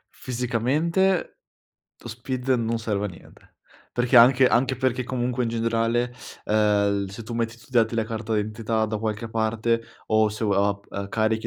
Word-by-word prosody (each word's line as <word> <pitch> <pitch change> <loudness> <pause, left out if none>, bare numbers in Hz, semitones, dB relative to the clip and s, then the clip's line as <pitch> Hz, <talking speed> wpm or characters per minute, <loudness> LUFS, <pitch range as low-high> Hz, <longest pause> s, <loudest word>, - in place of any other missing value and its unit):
Fisicamente 140 - 0 0.6
lo - - -11
SPID 125 +2 -5
non 115 -2 +1
serve 105 -3 -2
a - - -5
niente, 90 - -16 0.4
perché 120 +1 +2
anche 125 +2 +7
anche 130 +2 +2
perché 130 0 0
comunque 125 0 -1
in - - -1
generale, 115 +1 0 0.3
ehm, 105 -2 +2
l 95 - -8
se 100 +4 -8
tu 115 +1 -7
metti 115 -1 -1
i - - -18
tuoi 120 - -20
dati 115 -2 +2
della 110 -1 0
carta 110 0 -3
d'identità 110 +1 -1
da 110 0 -3
qualche 110 +1 -3
parte 115 +1 0 0.3
o 110 0 +3
se 110 +3 -6
o 105 - +1 0.4
ap 100 0 -5
carichi 110 +1 0
115 Hz, 175 wpm, -24 LUFS, 110-125 Hz, 0.6 s, anche